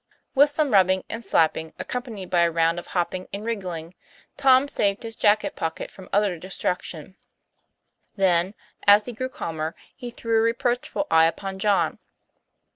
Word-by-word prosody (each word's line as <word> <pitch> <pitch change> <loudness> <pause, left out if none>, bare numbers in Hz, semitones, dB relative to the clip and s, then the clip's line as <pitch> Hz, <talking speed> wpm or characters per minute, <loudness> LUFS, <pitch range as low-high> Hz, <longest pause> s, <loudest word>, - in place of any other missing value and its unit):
With 285 +2 +6
some 295 -1 0
rubbing 190 -1 +4
and 230 +1 -5
slapping 160 -3 +1
accompanied 230 -7 -5
by 175 - +4
a 170 - +4
round 165 +1 +1
of - - -11
hopping 180 +1 -2
and 200 +2 -6
wriggling 180 -7 -4 0.4
Tom 265 0 +5
saved 200 -5 0
his 225 -1 -6
jacket 210 0 +2
pocket 165 - -4
from 190 - -13
utter 200 -4 +1
destruction; 180 -1 -4 1.0
then 185 0 +2 0.3
as 205 +1 +7
he 245 - -6
grew 255 +3 -4
calmer 160 -9 -4 0.2
he 245 -3 -7
threw 230 -1 0
a - - +3
reproachful 240 +5 0
eye 160 0 +6
upon 190 +3 -3
John. 205 0 +1
195 Hz, 155 wpm, -24 LUFS, 175-230 Hz, 1.0 s, as